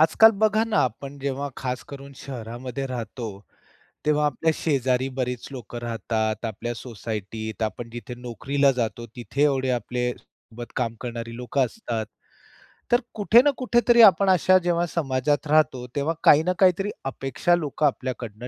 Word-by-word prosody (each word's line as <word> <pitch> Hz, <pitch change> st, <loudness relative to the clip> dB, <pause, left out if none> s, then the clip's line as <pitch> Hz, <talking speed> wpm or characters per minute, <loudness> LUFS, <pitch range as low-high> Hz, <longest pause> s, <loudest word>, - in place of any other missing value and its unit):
आजकाल 220 Hz, +8 st, +7 dB
बघा 215 Hz, +1 st, +4 dB
ना 225 Hz, -1 st, 0 dB
आपण 135 Hz, +4 st, -5 dB
जेव्हा 140 Hz, +1 st, -3 dB
खास 125 Hz, -2 st, -3 dB
करून 140 Hz, 0 st, -10 dB
शहरामध्ये 125 Hz, +1 st, -6 dB
राहतो, 120 Hz, -2 st, -5 dB, 0.8 s
तेव्हा 150 Hz, 0 st, +3 dB
आपल्या 160 Hz, +2 st, +1 dB
शेजारी 130 Hz, -4 st, 0 dB
बरीच 125 Hz, -2 st, -2 dB
लोकं 120 Hz, -2 st, -7 dB
राहतात, 110 Hz, -1 st, -2 dB
आपल्या 115 Hz, +2 st, -4 dB
सोसायटीत. 110 Hz, -2 st, -6 dB
आपण 115 Hz, +2 st, -3 dB
जिथे 120 Hz, +1 st, -7 dB
नोकरीला 135 Hz, +4 st, 0 dB
जातो 120 Hz, -1 st, -3 dB
तिथे 125 Hz, +3 st, -2 dB
एवढे 135 Hz, -3 st, +1 dB
आपले 125 Hz, 0 st, -1 dB
सोबत 120 Hz, +1 st, -13 dB
काम 115 Hz, -3 st, -1 dB
करणारी 115 Hz, -1 st, -6 dB
लोकं 125 Hz, +2 st, 0 dB
असतात. 115 Hz, -, -4 dB, 0.9 s
तर 240 Hz, +1 st, +4 dB
कुठे 220 Hz, +2 st, +6 dB
ना 290 Hz, +2 st, +3 dB
कुठेतरी 240 Hz, -1 st, +4 dB
आपण 195 Hz, -1 st, +6 dB
अशा 185 Hz, +1 st, +5 dB
जेव्हा 175 Hz, 0 st, +1 dB
समाजात 145 Hz, -1 st, 0 dB
राहतो, 145 Hz, -5 st, +2 dB
तेव्हा 150 Hz, +3 st, 0 dB
काही 150 Hz, +2 st, +7 dB
ना 180 Hz, +2 st, +1 dB
काहीतरी 190 Hz, +1 st, +3 dB, 0.2 s
अपेक्षा 135 Hz, +5 st, 0 dB
लोक 155 Hz, -3 st, -4 dB
आपल्याकडून 125 Hz, -5 st, -2 dB
130 Hz, 145 wpm, -24 LUFS, 120-155 Hz, 0.9 s, आजकाल